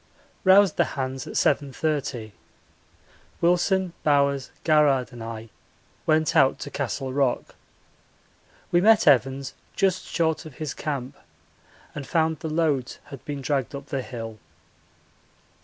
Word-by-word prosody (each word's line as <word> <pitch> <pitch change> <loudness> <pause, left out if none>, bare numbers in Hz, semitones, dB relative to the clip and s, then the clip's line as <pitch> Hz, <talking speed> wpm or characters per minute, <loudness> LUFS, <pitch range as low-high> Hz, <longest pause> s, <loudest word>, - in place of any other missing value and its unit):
Roused 195 +1 +6
the - - +5
hands 130 -1 -3
at - - -7
7.30. 140 -5 0 1.1
Wilson, 180 +1 +2
Bowers, 140 -2 +2
Garrard, 145 -6 +3
and 120 -1 -8
I 115 0 -7 0.6
went 155 -1 +2
out 135 -1 +5
to 145 - -6
Castle 135 -1 -3
Rock. 135 -3 0 1.2
We 175 - +4
met 220 +2 +5
Evans 135 -1 +3 0.2
just 190 -2 +1
short 160 -2 0
of 145 - -13
his 155 -4 -4
camp 135 -4 -4 0.8
and 140 -3 -7
found 160 -2 +1
the 160 - -4
loads 155 -5 0
had 140 - -9
been 145 -2 -4
dragged 140 -2 -1
up 140 0 -7
the 135 -1 -3
hill. 115 -3 -7
140 Hz, 125 wpm, -25 LUFS, 130-160 Hz, 1.2 s, Roused